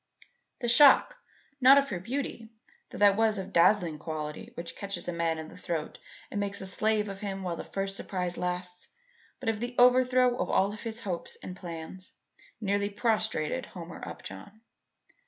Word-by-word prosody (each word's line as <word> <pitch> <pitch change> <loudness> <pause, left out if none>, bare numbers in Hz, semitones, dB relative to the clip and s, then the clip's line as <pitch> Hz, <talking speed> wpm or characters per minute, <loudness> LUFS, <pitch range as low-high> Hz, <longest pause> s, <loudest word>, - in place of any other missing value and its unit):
The 240 - -1
shock, 290 - +7 0.4
not 265 +2 +8
of 280 0 +3
her 185 - -2
beauty, 230 +1 -4 0.4
though - - -9
that 205 -1 +5
was 220 0 +2
of 190 - -3
the 195 - -13
dazzling 170 -3 +3
quality 150 -1 -5
which 170 0 -7
catches 200 -2 -5
a 175 - -2
man 165 -1 0
in 160 0 -7
the - - -13
throat 170 -4 -4 0.3
and 205 - -2
makes 200 0 -2
a 190 - -6
slave 210 +3 +1
of 195 -1 -7
him 195 -2 -4
while 175 -2 -2
the - - -6
first 195 0 -2
surprise 180 -2 -3
lasts, 180 0 -4 0.5
but 260 - -8
of 220 -2 0
the 240 +1 -4
overthrow 250 0 +5
of - - -1
all 195 +1 +2
his 225 +2 -6
hopes 185 -6 -4
and 180 - -7
plans, 175 +1 -8 0.5
nearly 200 -1 0
prostrated 220 -2 0
Homer 170 -2 -9
Upjohn. 95 - -9
195 Hz, 175 wpm, -29 LUFS, 175-225 Hz, 0.5 s, not